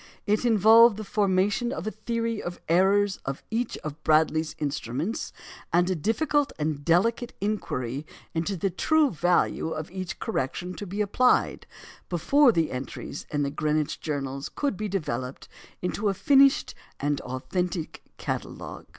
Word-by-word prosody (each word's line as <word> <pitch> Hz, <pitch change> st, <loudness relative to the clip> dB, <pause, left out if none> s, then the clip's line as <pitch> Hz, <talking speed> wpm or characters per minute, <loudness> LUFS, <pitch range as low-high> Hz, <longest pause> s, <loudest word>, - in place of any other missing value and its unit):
It 210 Hz, +3 st, +1 dB
involved 225 Hz, 0 st, +7 dB
the 215 Hz, -, -5 dB
formation 205 Hz, +3 st, +1 dB
of 165 Hz, -, -4 dB
a 215 Hz, -, -2 dB
theory 230 Hz, 0 st, -2 dB
of 175 Hz, 0 st, -5 dB
the -, -, -8 dB
errors 195 Hz, +2 st, +3 dB
of 135 Hz, 0 st, -5 dB
each 230 Hz, +1 st, -1 dB
of 155 Hz, 0 st, -7 dB
Bradley's 155 Hz, 0 st, +2 dB
instruments, 150 Hz, -, -3 dB, 0.4 s
and 175 Hz, +2 st, +3 dB
a -, -, +1 dB
difficult 280 Hz, -, +1 dB
and 150 Hz, -2 st, -2 dB
delicate 230 Hz, -, +2 dB
inquiry 145 Hz, -, -3 dB, 0.3 s
into 170 Hz, +4 st, -1 dB
the 195 Hz, +2 st, 0 dB
true 305 Hz, -, +3 dB
value 175 Hz, -1 st, +1 dB
of 155 Hz, +1 st, -5 dB
each 185 Hz, -1 st, -5 dB
correction 180 Hz, -, -2 dB
to 205 Hz, -, -6 dB
be 200 Hz, +4 st, -2 dB
applied, 250 Hz, +5 st, +2 dB, 0.4 s
before 260 Hz, -, +4 dB
the 165 Hz, -6 st, 0 dB
entries 130 Hz, +2 st, -6 dB
in 145 Hz, -1 st, 0 dB
the 140 Hz, -, -1 dB
Greenwich 150 Hz, 0 st, -1 dB
journals 140 Hz, -3 st, -3 dB
could 285 Hz, -7 st, -2 dB
be 215 Hz, +2 st, -3 dB
developed 135 Hz, -9 st, -3 dB, 0.4 s
into 200 Hz, +3 st, 0 dB
a 195 Hz, -, -1 dB
finished 275 Hz, +2 st, +4 dB, 0.3 s
and 145 Hz, 0 st, 0 dB
authentic 170 Hz, +6 st, -3 dB, 0.2 s
catalogue. -, -, -5 dB
180 Hz, 150 wpm, -26 LUFS, 155-215 Hz, 0.4 s, involved